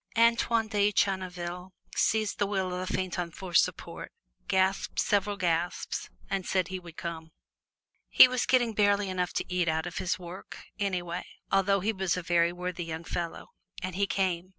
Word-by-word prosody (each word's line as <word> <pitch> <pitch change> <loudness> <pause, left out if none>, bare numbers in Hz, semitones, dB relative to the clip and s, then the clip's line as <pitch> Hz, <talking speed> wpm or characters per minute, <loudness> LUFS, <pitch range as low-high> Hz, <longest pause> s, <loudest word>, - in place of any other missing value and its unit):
Antoine 230 -1 +3
de 205 -1 +2
Channeville 180 -2 -1 0.2
seized 215 -1 +1
the 205 - +2
wheel 190 -2 -1
of 180 +1 -3
the - - -3
phaeton 180 -2 -2
for 180 +1 -9
support, - - +1 0.4
gasped 190 0 +1
several 205 0 +1
gasps, 175 -1 -1 0.2
and 195 - -1
said 185 -1 0
he 185 0 -4
would 170 -2 -13
come. 165 -2 -5 0.8
He - - +9
was 250 -1 -1
getting 240 -3 +3
barely 205 -1 +3
enough 180 -1 -1
to - - -1
eat 180 -1 +1
out 160 0 0
of 175 - -4
his 180 - 0
work, 180 +1 -9 0.2
anyway, 180 -4 -2 0.3
although 195 0 +3
he 220 +4 0
was 190 -3 0
a 180 - -3
very 170 0 +3
worthy 180 0 -4
young 160 0 -5
fellow. 170 0 -4 0.3
And 185 0 -3
he 200 +1 +1
came. 185 -2 -1
185 Hz, 175 wpm, -29 LUFS, 175-200 Hz, 0.8 s, He